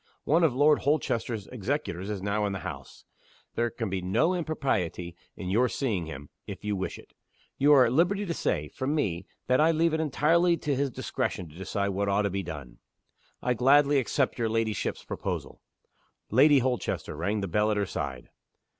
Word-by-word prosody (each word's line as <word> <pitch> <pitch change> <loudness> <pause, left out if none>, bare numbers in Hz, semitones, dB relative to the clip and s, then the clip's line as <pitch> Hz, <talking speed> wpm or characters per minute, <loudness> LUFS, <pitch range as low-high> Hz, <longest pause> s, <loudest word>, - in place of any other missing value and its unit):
One 165 +4 +3
of 145 -7 +3
Lord 150 +2 +5
Holchester's 120 -7 -1
executors 115 - -3
is 100 -3 -4
now 105 +1 0
in 100 - -3
the 95 - -5
house. - - -8 0.5
There 120 0 0
can 115 -1 -4
be 95 -1 -2
no 110 - +2
impropriety 110 - -2 0.2
in 95 -1 -5
your 120 +5 +3
seeing 105 - -2
him 70 -2 -8 0.2
if - - -7
you 105 -1 -1
wish 95 - -4
it. - - -16 0.5
You 145 +2 +5
are 130 -3 +7
at 115 - 0
liberty 195 +7 +2
to 170 - -2
say, - - -1
from 140 +2 -2
me, 95 - -1 0.2
that 130 +3 +3
I 160 - +5
leave 165 0 +2
it 160 - +1
entirely 165 +3 +3
to 150 -3 -1
his 140 +1 0
discretion 90 -7 -3
to 75 - -16
decide 100 +2 -2
what 100 +1 -1
ought 100 +1 +2
to 100 - 0
be 100 +1 -2
done." 70 -9 -8 0.6
"I 125 - +2
gladly 140 +4 +4
accept 130 0 0
your 115 -1 +1
ladyship's 110 -1 -1
proposal." - - -5 0.7
Lady 140 +6 +6
Holchester 125 - -1
rang 100 +7 -1
the 100 - -2
bell 105 +5 +1
at 105 - +1
her 100 - +1
side. 65 -7 -5
115 Hz, 190 wpm, -28 LUFS, 95-145 Hz, 0.7 s, are